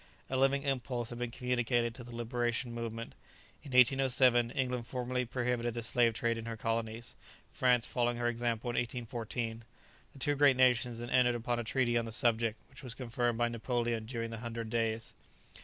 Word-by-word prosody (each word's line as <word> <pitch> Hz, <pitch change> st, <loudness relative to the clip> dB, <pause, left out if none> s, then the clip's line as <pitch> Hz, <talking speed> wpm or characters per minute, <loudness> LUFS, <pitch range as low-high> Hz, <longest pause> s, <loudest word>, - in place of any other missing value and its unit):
A -, -, 0 dB
living 135 Hz, +1 st, +3 dB
impulse 125 Hz, -3 st, -1 dB
had 120 Hz, -, -6 dB
been 120 Hz, -1 st, -2 dB
communicated 120 Hz, -1 st, 0 dB
to 125 Hz, 0 st, -9 dB
the 120 Hz, -, -12 dB
liberation 120 Hz, +1 st, -1 dB
movement. 115 Hz, 0 st, -5 dB, 0.5 s
In 145 Hz, -, -10 dB
1807, 125 Hz, -2 st, +5 dB
England 125 Hz, -2 st, -2 dB
formally 125 Hz, 0 st, -2 dB
prohibited 120 Hz, -1 st, -1 dB
the 120 Hz, -, -3 dB
slave 115 Hz, 0 st, +2 dB
trade 115 Hz, 0 st, 0 dB
in 115 Hz, -, -7 dB
her 115 Hz, -1 st, -4 dB
colonies; 115 Hz, +1 st, -2 dB, 0.4 s
France 125 Hz, -2 st, +3 dB
following 120 Hz, -1 st, 0 dB
her 120 Hz, 0 st, 0 dB
example 120 Hz, 0 st, -1 dB
in -, -, -4 dB
1814. 115 Hz, -1 st, -3 dB, 0.5 s
The -, -, -15 dB
two 145 Hz, +2 st, +1 dB
great 140 Hz, -2 st, +5 dB
nations 125 Hz, -2 st, +3 dB
then 120 Hz, +1 st, -6 dB
entered 125 Hz, -1 st, +4 dB
upon 120 Hz, 0 st, -1 dB
a -, -, -2 dB
treaty 120 Hz, 0 st, +1 dB
on 115 Hz, -, -3 dB
the 115 Hz, -, -6 dB
subject, 115 Hz, -2 st, +1 dB
which 130 Hz, -, -14 dB
was 125 Hz, -3 st, -7 dB
confirmed 120 Hz, -2 st, -1 dB
by 120 Hz, 0 st, +2 dB
Napoleon 115 Hz, -1 st, -1 dB
during 115 Hz, -2 st, -4 dB
the 115 Hz, -, -5 dB
Hundred 115 Hz, -1 st, -5 dB
Days. 115 Hz, -1 st, -1 dB
120 Hz, 185 wpm, -32 LUFS, 115-125 Hz, 0.5 s, 1807